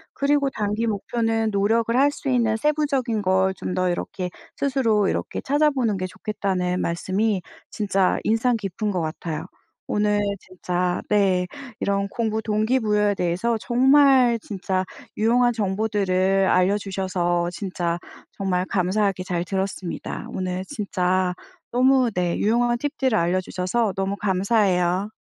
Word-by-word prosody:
그리고 280 Hz, 0 st, +2 dB
단기 215 Hz, +1 st, -1 dB
목표는 225 Hz, +1 st, 0 dB
노력을 225 Hz, +3 st, +1 dB
할 280 Hz, +3 st, +5 dB
수 290 Hz, -, -5 dB
있는 235 Hz, -4 st, +2 dB
세부적인 275 Hz, -5 st, 0 dB
걸 190 Hz, 0 st, +2 dB
좀 185 Hz, -, -5 dB
더 185 Hz, 0 st, +1 dB
이렇게 180 Hz, +1 st, -3 dB, 0.3 s
스스로 230 Hz, -8 st, +1 dB
이렇게 -, -, -3 dB
찾아보는 275 Hz, -7 st, +1 dB
게 185 Hz, -, -3 dB
좋겠다는 185 Hz, -1 st, -2 dB
말씀이 190 Hz, +4 st, 0 dB, 0.3 s
진짜 195 Hz, -3 st, +1 dB
인상 225 Hz, +3 st, +2 dB
깊은 210 Hz, +1 st, -3 dB
것 180 Hz, -3 st, -1 dB
같아요. 155 Hz, 0 st, -4 dB, 0.4 s
오늘 210 Hz, 0 st, +1 dB, 0.2 s
진짜 180 Hz, -1 st, -2 dB
네 190 Hz, -3 st, +3 dB, 0.3 s
이런 200 Hz, 0 st, 0 dB
공부 220 Hz, -1 st, -1 dB
동기부여에 215 Hz, -1 st, +1 dB
대해서 180 Hz, +7 st, 0 dB
정말 260 Hz, -1 st, +4 dB
진짜 190 Hz, -2 st, -2 dB, 0.3 s
유용한 240 Hz, +2 st, +3 dB
정보들을 195 Hz, -2 st, +1 dB
알려주셔서 185 Hz, -2 st, +1 dB
진짜 175 Hz, -2 st, -3 dB, 0.3 s
정말 185 Hz, -2 st, -1 dB
감사하게 190 Hz, +1 st, 0 dB
잘 175 Hz, -1 st, -2 dB
들었습니다. 190 Hz, -1 st, -4 dB
오늘 185 Hz, 0 st, -3 dB
진짜 185 Hz, -6 st, 0 dB, 0.4 s
너무 255 Hz, 0 st, +4 dB
네 180 Hz, -2 st, 0 dB
유용한 240 Hz, +2 st, +2 dB
팁들을 265 Hz, -3 st, 0 dB
알려주셔서 185 Hz, +4 st, 0 dB
너무 195 Hz, +1 st, -1 dB
감사해요. 190 Hz, -1 st, +1 dB
200 Hz, 295 characters per minute, -23 LUFS, 185-230 Hz, 0.4 s, 할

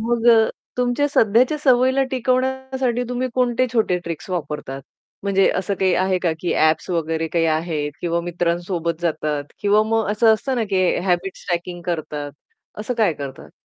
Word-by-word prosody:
मग 235 Hz, +1 st, 0 dB
अ, 225 Hz, -1 st, +5 dB, 0.3 s
तुमच्या 250 Hz, +3 st, +1 dB
सध्याच्या 245 Hz, +2 st, +3 dB
सवयीला 260 Hz, -1 st, +3 dB
टिकवण्यासाठी 260 Hz, 0 st, 0 dB
तुम्ही 250 Hz, +1 st, -2 dB
कोणते 250 Hz, 0 st, +2 dB
छोटे 215 Hz, -6 st, +2 dB
ट्रिक्स 165 Hz, +1 st, -6 dB
वापरतात? 150 Hz, -6 st, -4 dB, 0.4 s
म्हणजे 195 Hz, -1 st, +3 dB
असं 190 Hz, +2 st, -2 dB
काही 190 Hz, -1 st, +1 dB
आहे 185 Hz, 0 st, +1 dB
का, 175 Hz, -2 st, 0 dB
की 175 Hz, -, -1 dB
ॲप्स 155 Hz, 0 st, +2 dB
वगैरे 165 Hz, -1 st, -1 dB
काही 165 Hz, 0 st, +1 dB
आहेत 155 Hz, -2 st, -2 dB
किंवा 170 Hz, -1 st, 0 dB
मित्रांसोबत 170 Hz, -1 st, -2 dB
जातात 150 Hz, -3 st, -1 dB, 0.2 s
किंवा 205 Hz, +1 st, +4 dB
मग 220 Hz, -1 st, 0 dB
असं 220 Hz, +1 st, +4 dB
असतं 265 Hz, +5 st, -3 dB
ना, 235 Hz, -, +1 dB
की 185 Hz, -1 st, +2 dB, 0.2 s
हॅबिट्स 180 Hz, +1 st, -1 dB
ट्रॅकिंग 175 Hz, 0 st, -3 dB
करतात 150 Hz, -4 st, -3 dB, 0.5 s
असं 240 Hz, +4 st, -3 dB
काय 220 Hz, -7 st, +2 dB
करतात? 140 Hz, -3 st, -8 dB
190 Hz, 160 wpm, -21 LUFS, 170-240 Hz, 0.5 s, अ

